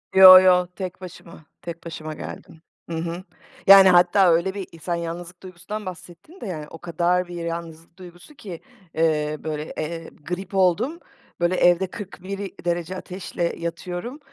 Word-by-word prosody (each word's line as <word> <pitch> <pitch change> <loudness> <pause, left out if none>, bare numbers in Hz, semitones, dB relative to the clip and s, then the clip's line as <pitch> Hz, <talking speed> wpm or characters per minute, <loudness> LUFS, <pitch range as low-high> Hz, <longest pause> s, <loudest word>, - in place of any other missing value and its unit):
Yo 185 -1 +11
yo, 180 -1 +4
tek 185 -1 -6
başıma, 170 -3 -12 0.2
tek 170 0 -8
başıma 155 -2 -6
geldim. 160 +1 -10 0.3
Hı 165 - -4
hı. 170 +2 -4 0.4
Yani, 195 -1 +10
hatta 180 +1 +5
öyle 170 +3 +1
bir 195 -2 -6
i 165 - -14
sen 175 +2 -2
yalnızlık 170 +2 -7
duygusundan 185 +4 -7
bahsettin 180 - -11
de, - - -6
yani, 155 -5 -6
o 165 - -10
kadar 175 +2 0
bir 175 - -8
yalnızlık 165 0 -7
duygusu 180 - -14
ki, 195 - -9 0.3
eee, 155 -2 +1
böyle, 155 -1 -5
eee, 165 +1 -5 0.2
grip 185 +2 -5
oldum, 205 - +1 0.4
böyle, 175 +1 +1
evde 175 +1 +3
41 195 -1 -8 0.3
derece 175 +1 -2
ateşle 180 -2 -4
yatıyorum 175 - -5
175 Hz, 155 wpm, -23 LUFS, 170-185 Hz, 0.4 s, Yo